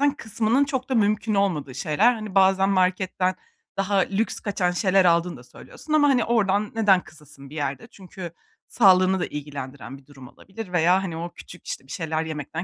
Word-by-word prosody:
kısmanın 220 -1 -2
zaten 280 - +5
çok 265 -3 -4
da 260 - 0
mümkün 215 0 +1
olmadığı 155 -10 -1
şeyler. 205 +11 +2
Hani, 215 -4 -7
bazen 195 0 +4
marketten 185 0 +1 0.4
daha 195 +1 0
lüks 195 +4 0
kaçan 185 -3 -1
şeyler 185 +1 +2
aldığını 170 -1 +2
da 125 - -14
söylüyorsun 305 - -9
ama, 290 -2 +5
hani, 250 -4 +3
oradan 210 -3 +1
neden 205 -4 +4
kısasın 150 -3 -13
bir 155 - -12
yerde? 145 +9 -4
Çünkü 185 -3 -9 0.4
sağlığını 190 -3 +4
da - - -1
ilgilendiren 140 -3 -8
bir 135 - -20
durum 135 -3 -14
olabilir 195 - -10
veya, 180 +2 +3
hani, 165 -3 -5
o 170 +1 -5
küçük, 180 - -13
işte, - - -5
bir - - -12
şeyler 160 -1 -2
yemekten 155 +2 -5
185 Hz, 185 wpm, -24 LUFS, 160-205 Hz, 0.4 s, zaten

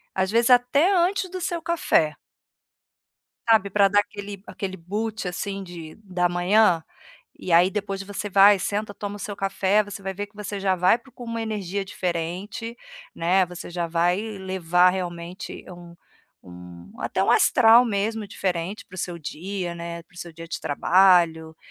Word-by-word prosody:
às 190 0 0
vezes 235 +2 +3
até 250 +9 +4
antes 370 +1 +1
do 370 - -6
seu 345 -2 -2
café. 310 - +1 1.3
Sabe, 220 -3 +4
para 200 +1 +4
dar 205 +1 +3
aquele 205 -1 -6
aquele 190 -2 -5
boot, 210 +3 -4
assim, 195 +2 -4
de 170 -3 -10
da 180 -2 0
manhã. 175 0 +3 0.5
E 180 - -5
aí 175 +2 +6
depois 195 -1 -4
você 205 +1 -5
vai, 200 +1 +7
senta, 205 +2 -3
toma 205 0 -6
o - - -15
seu 205 0 -5
café, 195 +1 +1
você 205 0 -9
vai 195 0 -4
ver 205 +2 -5
que 205 - -31
você 205 -1 -5
já 190 -1 +1
vai 185 +5 +4
para 270 +3 -20
com 245 0 -10
uma 230 0 -4
energia 200 -3 -3
diferente, 185 +6 -4 0.4
né, 180 +3 +2
você 175 0 -9
já 175 -1 -3
vai 175 +2 +1
levar 190 -4 +1
realmente 175 -1 -6
um 175 -1 -12 0.5
um 90 0 -12
até - - -1
um - - +3
astral 235 0 +6
mesmo 215 0 -2
diferente 185 0 -3
para - - -21
o - - -11
seu 175 -1 -4
dia, 180 +4 -5
né, 170 0 -6
para 185 - -31
o - - -14
seu 170 -1 -7
dia 165 +1 -10
de - - -5
trabalho, 165 0 +3
195 Hz, 175 wpm, -24 LUFS, 175-210 Hz, 1.3 s, vai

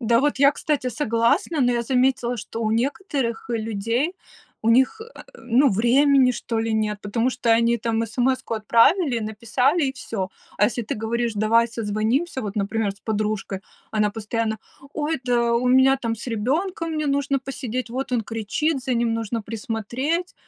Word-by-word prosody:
Да 230 0 +3
вот 290 0 0
я, 280 +1 +6
кстати, 290 -3 -1
согласна, 235 +5 +1
но 245 -1 +3
я 235 -1 0
заметила, 250 0 +1
что 225 +1 -6
у 215 - 0
некоторых 255 - -1
людей, 230 - -1 0.5
у 225 - +1
них, 260 - +3
э, 455 +2 -11 0.2
ну, 245 +4 +3
времени, 255 +5 +4
что 230 -1 -3
ли, 225 0 -1
нет, 210 -1 -1
потому 230 +5 0
что 240 -1 +1
они 230 +1 +3
там 225 0 0
смс-ку 255 +2 -1
отправили, 235 - +3
написали 230 +8 0
и 265 - -1
всё. 200 -7 -4 0.3
А - - +5
если 235 +2 0
ты 215 - -4
говоришь: 230 +1 -1
"Давай 225 +3 +3
созвонимся" 230 +7 -1
вот, 205 0 -5
например, 210 +1 0
с 200 - -23
подружкой, 210 -3 -2 0.3
она 210 -1 +2
постоянно: 220 +1 -2 0.3
"Ой, 305 -1 -2
да 235 -1 +2
у 245 +2 +1
меня 260 +1 +5
там 230 -3 -3
с 230 - -9
ребенком, 320 - -1
мне 305 -1 -1
нужно 280 0 +1
посидеть, 255 -2 -5
вот 260 +1 -4
он 235 - +1
кричит, 235 +7 -2
за 255 -1 -1
ним 235 -1 +1
нужно 225 0 -2
присмотреть." 235 - -3
235 Hz, 170 wpm, -23 LUFS, 225-265 Hz, 0.5 s, я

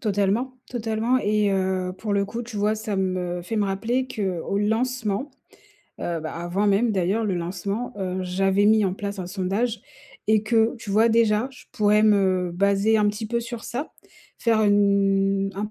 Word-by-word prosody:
Totalement, 210 +4 0 0.2
totalement 225 +1 0
et 210 -3 +1
heu, 190 -1 0
pour 210 +1 -3
le 200 0 +1
coup, 230 +4 -5
tu 230 -2 -8
vois, 210 +1 +2
ça 215 -1 -4
me 185 -2 -1
fait 220 +6 -4
me 210 - +2
rappeler 230 +7 -1
qu'au 195 -4 -2
lancement, 225 +3 -1 0.7
heu, 170 -1 -2
bah, 155 0 -6
avant 175 +4 -1
même 205 +4 +3
d'ailleurs 200 +3 0
le 200 -3 0
lancement, 195 +7 -3
heu, 185 -2 -3
j'avais 195 +2 +2
mis 215 0 +5
en 190 - 0
place 200 0 -5
un 175 - -6
sondage 200 +5 -1 0.5
et 215 0 +3
que, 225 +1 +2
tu 225 -3 -7
vois, 220 +3 +4
déjà 225 +1 +2
je 255 - -16
pourrais 210 -2 +3
me 190 -4 +3
baser 200 +4 +2
un 210 -1 +3
petit 210 +2 -3
peu 235 +2 -1
sur 235 0 -7
ça. 265 +6 -5 0.5
Faire 225 -2 +2
une 195 -1 +2
un 205 +2 -4
205 Hz, 180 wpm, -24 LUFS, 195-220 Hz, 0.7 s, mis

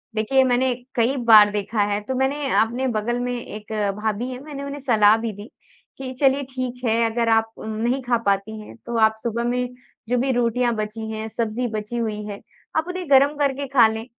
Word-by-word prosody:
देखिए 245 +5 +3
मैंने 255 0 +2 0.2
कई 240 +3 +2
बार 215 -2 +9
देखा 210 +1 -1
है 205 - 0
तो 260 - -2
मैंने 270 +2 0
अपने 245 +4 0
बगल 240 +1 -1
में 245 0 -2
एक 215 -2 -9 0.3
भाभी 220 +3 -1
है 250 - -6
मैंने 285 -2 -7
उन्हें 280 +1 -6
सलाह 220 -6 +4
भी 225 -1 -3
दी 205 +4 -11 0.5
कि 260 -1 -6
चलिए 275 0 +3
ठीक 255 -1 -4
है 225 0 +2
अगर 230 +1 0
आप 225 0 +2
नहीं 230 +5 -2
खा 245 -1 +1
पाती 200 +2 0
हैं 210 - -11
तो 235 -1 -3
आप 220 0 +4
सुबह 235 0 -2
में 250 0 -1 0.4
जो 250 - +2
भी 260 +2 +1
रोटियाँ 240 0 +1
बची 215 +1 -4
हैं, 220 0 -4
सब्ज़ी 230 +2 -2
बची 220 +1 -4
हुई 215 -2 -2
है 205 -1 -6 0.4
आप 315 +2 0
उन्हें 360 -3 -5
गरम 280 +2 +5
करके 280 -1 0
खा 250 -4 +5
लें 220 +1 -4
235 Hz, 205 wpm, -22 LUFS, 220-260 Hz, 0.5 s, बार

